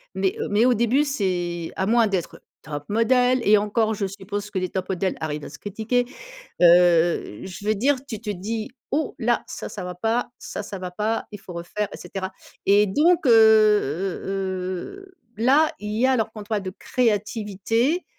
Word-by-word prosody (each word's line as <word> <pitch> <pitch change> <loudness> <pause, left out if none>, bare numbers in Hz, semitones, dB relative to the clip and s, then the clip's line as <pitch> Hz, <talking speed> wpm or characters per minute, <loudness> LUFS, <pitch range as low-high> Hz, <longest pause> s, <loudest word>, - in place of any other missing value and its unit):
mais 190 0 0
heu, - - -3
mais 215 +4 +4
au 250 - +5
début 240 +6 +2
c'est 175 - -2
à 190 - 0
moins 230 +1 +4
d'être 190 -4 -3 0.2
top 145 -2 -6
model 250 +3 +3
et 210 0 +7
encore 215 +2 +1
je 200 -1 -2
suppose 200 +1 -5
que 190 - -1
les 185 - -1
top 185 -1 -4
model 190 0 -1
arrivent 150 -1 -3
à - - -8
se - - -11
critiquer, 220 +4 -1 0.6
heu, 175 - +4
je 190 +2 -8
veux 215 0 +2
dire, 270 +7 +2
tu 220 -6 -6
te 220 -2 -7
dis: 215 +5 -4 0.2
«Oh 300 +1 -1
là 240 -1 +1
ça, - - -6
ça 185 -4 -6
va 180 -1 -6
pas, 225 +6 0
ça, 255 -4 -6
ça 200 -1 -7
va 180 -1 -6
pas, 215 +4 -1
il 205 - -8
faut 180 - -10
refaire 175 +5 -3
et - - -7
cetera» 190 -1 -6 0.3
et 205 +1 +5
donc 315 - +3
heu - - +6
heu 210 -7 +4 0.7
heu, 380 -1 -17 0.2
là, 275 +7 +4
il 210 0 -5
y 255 - +4
a - - +3
alors 220 -3 0
qu'on 215 -2 -8
toi 210 0 -1
de 190 - -4
créativité, 225 - 0
210 Hz, 195 wpm, -23 LUFS, 190-230 Hz, 0.7 s, et